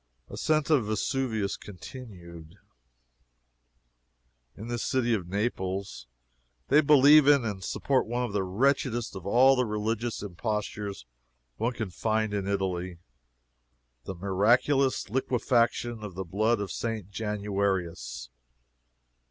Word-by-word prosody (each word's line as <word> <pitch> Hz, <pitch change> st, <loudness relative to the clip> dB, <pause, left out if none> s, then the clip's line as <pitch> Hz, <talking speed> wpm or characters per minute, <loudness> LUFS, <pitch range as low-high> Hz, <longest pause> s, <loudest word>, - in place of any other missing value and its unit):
ASCENT 155 Hz, 0 st, 0 dB
OF 140 Hz, -6 st, +4 dB
VESUVIUS 110 Hz, -1 st, -1 dB
CONTINUED. 90 Hz, -6 st, -11 dB, 2.0 s
In 110 Hz, -, -8 dB
this 120 Hz, -1 st, -3 dB
city 120 Hz, -3 st, +1 dB
of 95 Hz, -6 st, -2 dB
Naples, 95 Hz, -, -3 dB, 0.6 s
they 150 Hz, -, +6 dB
believe 145 Hz, 0 st, +7 dB
in 140 Hz, -4 st, +5 dB
and 100 Hz, -4 st, -4 dB
support 130 Hz, +7 st, 0 dB
one 120 Hz, +2 st, -1 dB
of 120 Hz, -5 st, -4 dB
the 100 Hz, -, +1 dB
wretchedest 120 Hz, +3 st, 0 dB
of 95 Hz, 0 st, -7 dB
all 130 Hz, +6 st, +5 dB
the 125 Hz, -, +2 dB
religious 110 Hz, +2 st, -2 dB
impostures 105 Hz, -, -4 dB, 0.5 s
one 120 Hz, +2 st, -1 dB
can 110 Hz, -6 st, -4 dB
find 110 Hz, +2 st, -1 dB
in 100 Hz, -1 st, -2 dB
Italy 95 Hz, -3 st, -2 dB, 1.1 s
the 95 Hz, -, -5 dB
miraculous 120 Hz, +9 st, +2 dB
liquefaction 120 Hz, -1 st, 0 dB
of 100 Hz, -4 st, -7 dB
the 95 Hz, 0 st, -4 dB
blood 110 Hz, +6 st, +1 dB
of 100 Hz, -3 st, -4 dB
St. 110 Hz, -3 st, -4 dB
Januarius. 100 Hz, -, -2 dB
105 Hz, 115 wpm, -28 LUFS, 95-120 Hz, 2.0 s, believe